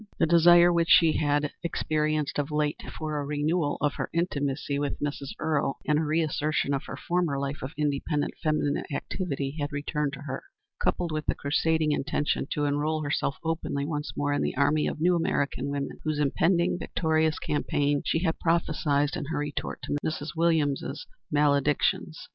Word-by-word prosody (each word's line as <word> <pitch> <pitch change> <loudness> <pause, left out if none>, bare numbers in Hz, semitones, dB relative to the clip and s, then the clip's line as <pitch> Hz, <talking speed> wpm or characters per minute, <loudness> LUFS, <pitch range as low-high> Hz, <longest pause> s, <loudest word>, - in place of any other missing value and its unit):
The - - +3
desire 170 +1 +6
which 170 0 +1
she 165 -3 +6
had 145 -1 +1
experienced 155 -3 -1
of 145 0 -1
late 150 0 -1 0.2
for 155 -2 -2
a - - -2
renewal 150 +2 0
of 145 -1 +2
her - - -3
intimacy 145 -4 -1
with 145 -1 -2
Mrs. 145 -1 -3
Earle 150 -3 0
and 150 0 +2
a - - 0
reassertion 155 -2 0
of 140 +1 -2
her - - -7
former 175 -5 0
life 140 +1 -3
of 130 - -5
independent 145 0 -1
feminine 155 -2 0
activity 140 -2 -3
had 145 0 -2
returned 145 0 -2
to 140 - -7
her, 135 -2 -5 0.4
coupled 175 -2 0
with 155 0 -3
the - - +1
crusading 155 +2 +1
intention 145 -1 0
to 150 - -1
enroll 150 +2 0
herself 145 -1 -1
openly 160 -3 -2
once 150 -1 -3
more 145 0 +1
in 145 - 0
the - - -2
army 150 +2 +3
of - - -4
new 175 +2 +3
American 140 -5 0
women, 140 -1 -4
whose 155 -1 -1
impending 170 +5 +2
victorious 160 -2 +1
campaign 145 -1 0
she 165 - 0
had 165 -3 0
prophesied 150 -4 +1
in 150 - -3
her 160 - -3
retort 145 0 -4
to - - -2
Mrs. 155 -1 -3
Williams's 160 - +1 0.3
maledictions. 145 +2 +1
150 Hz, 170 wpm, -27 LUFS, 145-160 Hz, 0.4 s, desire